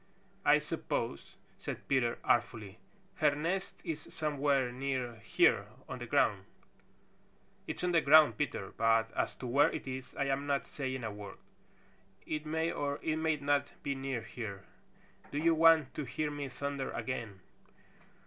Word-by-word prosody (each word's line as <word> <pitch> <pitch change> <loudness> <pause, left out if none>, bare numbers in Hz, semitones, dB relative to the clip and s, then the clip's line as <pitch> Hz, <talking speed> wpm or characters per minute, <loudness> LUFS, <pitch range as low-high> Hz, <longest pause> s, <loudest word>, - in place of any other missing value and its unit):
"I - - +6
suppose," - - -3 0.2
said - - -6
Peter 125 -4 +2
artfully, 110 -4 0 0.4
"her 150 -3 +3
nest 180 +6 -2
is 160 -4 -3
somewhere 140 -4 +1
near 130 -2 -3
here 110 -1 +3 0.2
on - - -6
the - - -6
ground." - - +2 1.2
"It's - - -4
on 180 - +2
the 165 -2 +4
ground, 155 +2 +7
Peter, 135 -9 -3
but 115 0 +3
as - - 0
to - - -8
where 140 +6 +4
it - - -6
is 130 -1 -6
I 140 - 0
am 140 +1 -1
not 140 -1 +1
saying 130 -3 -4
a 110 - -2
word. 100 -1 -9 0.9
It 155 0 -3
may 160 +2 0
or 145 0 -2
it 155 0 0
may 160 0 +1
not 145 0 0
be 140 - 0
near 135 -3 -3
here. 100 -6 -6 0.7
Do 145 - -3
you 165 +2 +4
want 160 -3 +5
to 150 - -4
hear 150 +3 -2
me 145 -2 -4
thunder 140 +1 -3
again?" 115 -7 -4
140 Hz, 160 wpm, -33 LUFS, 125-150 Hz, 1.2 s, ground